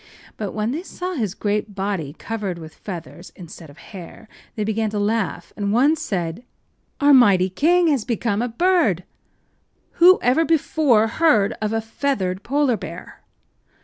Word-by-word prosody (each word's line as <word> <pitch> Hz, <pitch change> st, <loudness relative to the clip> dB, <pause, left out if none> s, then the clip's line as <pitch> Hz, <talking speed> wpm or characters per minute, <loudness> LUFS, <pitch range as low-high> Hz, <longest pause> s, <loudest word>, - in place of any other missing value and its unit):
But 205 Hz, -4 st, -5 dB
when 215 Hz, +2 st, -1 dB
they 305 Hz, +6 st, -3 dB
saw 365 Hz, 0 st, -6 dB
his 215 Hz, -, -3 dB
great 210 Hz, 0 st, -2 dB
body 190 Hz, -7 st, -3 dB
covered 210 Hz, -6 st, -4 dB
with 160 Hz, -1 st, -10 dB
feathers 175 Hz, -2 st, -9 dB
instead 170 Hz, -2 st, -12 dB
of 145 Hz, -, -16 dB
hair 195 Hz, +3 st, -12 dB, 0.3 s
they 215 Hz, -, -2 dB
began 220 Hz, +1 st, -1 dB
to 210 Hz, -, -4 dB
laugh, 205 Hz, -4 st, -2 dB
and 200 Hz, -1 st, -2 dB
one 270 Hz, +8 st, +4 dB
said: 195 Hz, -, -4 dB, 0.6 s
“Our 285 Hz, 0 st, +5 dB
mighty 195 Hz, -8 st, +5 dB
king 345 Hz, -, +3 dB
has 275 Hz, -7 st, +1 dB
become 230 Hz, -2 st, -1 dB
a 245 Hz, -, 0 dB
bird! 250 Hz, -, +1 dB, 1.0 s
Who 365 Hz, +2 st, +8 dB
ever 255 Hz, +7 st, +3 dB
before 300 Hz, -8 st, +2 dB
heard 225 Hz, -4 st, +2 dB
of 215 Hz, 0 st, -1 dB
a 225 Hz, 0 st, 0 dB
feathered 220 Hz, -5 st, -2 dB
polar 275 Hz, -2 st, +1 dB
bear? -, -, -10 dB
220 Hz, 155 wpm, -21 LUFS, 195-280 Hz, 1.0 s, Who